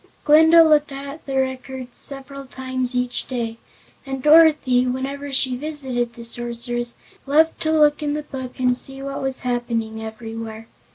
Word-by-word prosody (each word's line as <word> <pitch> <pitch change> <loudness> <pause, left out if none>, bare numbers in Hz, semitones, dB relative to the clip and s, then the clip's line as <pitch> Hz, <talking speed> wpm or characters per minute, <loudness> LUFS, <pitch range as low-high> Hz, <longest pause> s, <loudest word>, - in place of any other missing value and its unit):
Glinda 320 +2 +7
looked 300 -2 +3
at 280 +2 -8
the 270 -1 -2
records 260 -1 -3
several 275 0 -5
times 255 -1 -3
each 250 0 -2
day, 230 -3 -3 0.5
and 270 -1 -5
Dorothy, 300 -5 +5
whenever 275 +3 -3
she 260 -1 +1
visited 260 -4 -3
the 235 - -9
Sorceress, 240 0 -3 0.3
loved 315 +3 +3
to 315 - +1
look 300 -1 +4
in 295 -1 -1
the 300 - -3
Book 260 -4 -8
and 250 -1 +3
see 270 +2 -6
what 275 0 -4
was 265 -1 -3
happening 230 -3 -2
everywhere. 225 0 -7
260 Hz, 155 wpm, -22 LUFS, 245-285 Hz, 0.5 s, Glinda